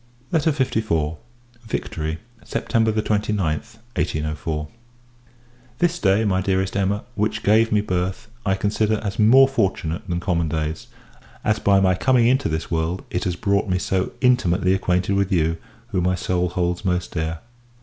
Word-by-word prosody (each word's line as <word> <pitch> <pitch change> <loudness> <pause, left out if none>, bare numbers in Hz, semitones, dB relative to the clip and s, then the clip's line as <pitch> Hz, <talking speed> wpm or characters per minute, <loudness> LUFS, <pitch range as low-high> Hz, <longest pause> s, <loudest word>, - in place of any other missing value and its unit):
LETTER 160 -1 +2
LIV. 110 - 0 0.5
Victory, 80 -6 -3 0.3
September 115 -1 0
29th, 105 -1 0 0.6
1804. 75 0 -2 1.1
This 175 +2 +1
day, 100 +2 +3
my 95 -2 +1
dearest 95 0 0
Emma, 100 +1 0
which 105 0 -1
gave 110 +2 +4
me 105 -1 +3
birth, 90 -1 -2 0.2
I 95 -2 +1
consider 105 +2 +1
as 100 -1 -4
more 130 +5 +7
fortunate 95 -10 -1
than 85 0 -1
common 85 -3 0
days; 80 0 -3 0.6
as, 110 0 +1
by 100 -2 +4
my 95 -1 +4
coming 125 +5 +3
into 130 +3 +2
this 80 +1 -3
world, 80 +2 -1
it 90 - -2
has 90 -2 -1
brought 100 +1 0
me 90 - +2
so 95 0 -1
intimately 95 -7 +3
acquainted 90 0 +1
with 100 0 +1
you, 80 -2 +1 0.3
who 95 -5 0
my 90 +1 +1
soul 90 0 0
holds 90 +2 -1
most 90 -2 -1
dear. 80 0 -2
95 Hz, 150 wpm, -22 LUFS, 85-110 Hz, 1.1 s, more